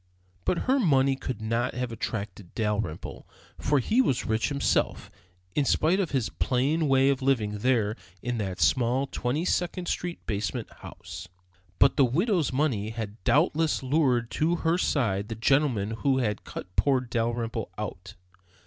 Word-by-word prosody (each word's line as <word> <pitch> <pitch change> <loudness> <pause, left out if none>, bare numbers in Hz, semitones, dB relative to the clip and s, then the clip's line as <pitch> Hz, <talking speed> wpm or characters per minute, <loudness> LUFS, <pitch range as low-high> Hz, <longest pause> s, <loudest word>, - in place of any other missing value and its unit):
But - - +2
then - - -3
her 265 +2 +3
money 135 - +3
could 125 -4 -5
not 115 +3 -1
have 125 -1 -2
attracted 100 -3 -5
Dalrymple, 105 -7 -3 0.3
for 145 +1 +2
he 220 - +3
was 135 - 0
rich 110 0 0
himself, 140 -1 0 0.4
in 145 - +2
spite 165 +7 +2
of 185 -5 0
his 130 -5 0
plain 145 +5 +1
way 135 0 +4
of 135 - -2
living 110 -6 +1
there 110 -3 +1 0.3
in 120 -1 -2
that 95 -3 -3
small 130 +1 +2
Twenty 140 +5 -2
second 180 0 -1
Street 175 -1 -3
basement 100 -5 -3
house. - - -9 0.5
But - - +4
the 140 - +6
widow's 170 - +1
money 130 -7 0
had 110 -1 -6
doubtless 155 -1 +2
lured 130 -4 +2
to 165 +3 +1
her 165 +2 +3
side 105 - 0
the 115 - -3
gentleman 120 -3 +2
who 130 +4 +1
had 105 -5 -1
cut 90 - -8
poor 135 -3 +3
Dalrymple 115 -2 -2
out. 95 -3 -6
125 Hz, 160 wpm, -27 LUFS, 110-145 Hz, 0.5 s, the